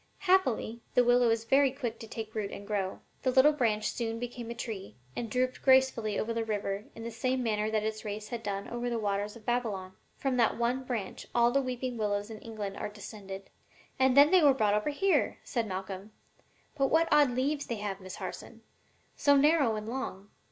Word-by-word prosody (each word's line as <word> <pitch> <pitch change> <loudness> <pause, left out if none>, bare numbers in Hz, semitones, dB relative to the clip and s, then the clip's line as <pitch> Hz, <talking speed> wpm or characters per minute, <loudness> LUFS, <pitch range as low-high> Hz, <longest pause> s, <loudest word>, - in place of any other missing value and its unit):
Happily, 310 - +1
the 250 - +6
willow 245 0 +4
is 225 0 +1
very 270 +4 +4
quick 245 -4 -4
to 225 - -8
take 220 -1 -6
root 210 -2 -2
and 200 - -8
grow. 200 -2 -2 0.2
The 260 - +1
little 260 +4 +6
branch 225 -7 0
soon 230 -1 -3
became 240 0 -6
a 235 - -5
tree, 220 -5 -6 0.2
and 235 -2 -3
drooped 255 +2 0
gracefully 260 -5 +3
over 230 +1 -1
the 230 0 -1
river 205 -1 -2
in 225 - -8
the 230 - -5
same 255 +3 -1
manner 215 -2 0
that 215 -1 0
its 215 0 -3
race 210 0 -5
had 235 -2 -4
done 200 -2 -3
over 240 +1 -3
the 235 - -1
waters 205 0 -1
of 225 -2 -14
Babylon. 210 -7 -1 0.2
From 265 -2 -1
that 235 -2 +3
one 245 +3 0
branch 225 -7 -4
all 240 0 +5
the 275 +2 +3
weeping 255 -1 -3
willows 205 0 -1
in 215 - -8
England 210 -3 -6
are - - -3
descended.'" 200 -2 -9 0.5
"And 265 0 +4
then 285 +2 +8
they 370 -1 +6
were 285 -3 +6
brought 215 -5 +2
over 210 +7 +1
here," 380 +7 +1
said 235 -4 -2
Malcolm. 190 +1 -5 0.6
"But 275 -2 +2
what 325 +3 +3
odd 295 -2 +6
leaves 275 +4 -1
they 235 - -2
have, 205 -2 -4
Miss 185 0 -8
Harson! - - -8 0.5
so 285 -1 +4
narrow 285 -5 +4
and 215 0 -5
long. 225 -5 -5
230 Hz, 210 wpm, -30 LUFS, 210-255 Hz, 0.6 s, then